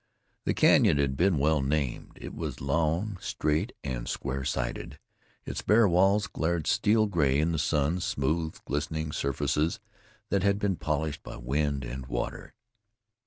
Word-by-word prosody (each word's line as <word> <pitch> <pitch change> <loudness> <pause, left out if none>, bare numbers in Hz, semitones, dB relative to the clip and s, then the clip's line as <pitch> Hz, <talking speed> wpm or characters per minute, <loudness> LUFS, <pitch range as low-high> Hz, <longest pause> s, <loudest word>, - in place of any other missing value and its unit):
The - - +1
canyon - - +5
had 70 -2 +1
been 90 +2 +3
well 75 +1 +2
named. 70 -2 -2
It - - -7
was - - -5
long, 80 +8 0
straight 80 +10 -1
and 65 -4 -4
square 70 0 -3
sided; 60 -1 -3 0.5
its - - -4
bare 110 +1 +5
walls 95 +4 +3
glared 80 -1 -1
steel 110 +1 +3
gray 75 -9 +2
in 80 +2 +2
the 80 - -1
sun, 75 +2 +1
smooth, 80 +1 -1
glistening 80 +2 -2
surfaces 70 +3 0 0.5
that 100 - +1
had 100 +1 +2
been 100 -2 0
polished 75 -1 -2
by - - -9
wind 70 +2 -1
and 65 +1 -6
water. - - -4
75 Hz, 150 wpm, -28 LUFS, 70-85 Hz, 0.5 s, canyon